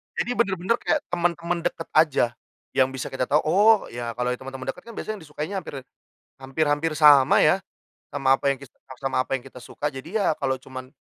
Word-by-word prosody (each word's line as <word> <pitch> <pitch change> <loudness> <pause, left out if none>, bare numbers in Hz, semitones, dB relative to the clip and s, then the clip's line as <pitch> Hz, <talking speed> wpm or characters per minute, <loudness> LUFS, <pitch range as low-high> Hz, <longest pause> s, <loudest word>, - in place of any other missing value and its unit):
Jadi 245 - -1
bener-bener 200 -2 +1
kayak 300 - 0
temen-temen 170 0 0
deket 165 -1 -7
aja, 155 -5 +4 0.5
yang 130 -1 +4
bisa 130 -1 -5
kita 130 -1 -2
tahu, 150 - +3
oh 205 +8 +5 0.2
ya, 120 -1 -4
kalau 125 0 -1
temen-temen 130 +1 -7
deket - - -16
kan - - -8
biasanya 215 - -4
yang - - -13
disukainya 150 +5 -5
hampir 160 - -9 0.6
hampir 135 +4 -1
hampir 155 +2 0
sama 145 -4 +7
ya, 170 +5 +4 0.5
sama 135 -1 +3
apa 140 +1 +1
yang 135 - -1
kita 140 -1 -14
s 130 - -15
sama 135 0 -3
apa - - -20
yang - - -16
kita 130 -1 -12
suka. 150 - -5
Jadi 150 +10 -4
ya 190 -6 +2
kalau 135 -3 -2
cuman 130 0 -10
145 Hz, 205 wpm, -24 LUFS, 130-170 Hz, 0.6 s, sama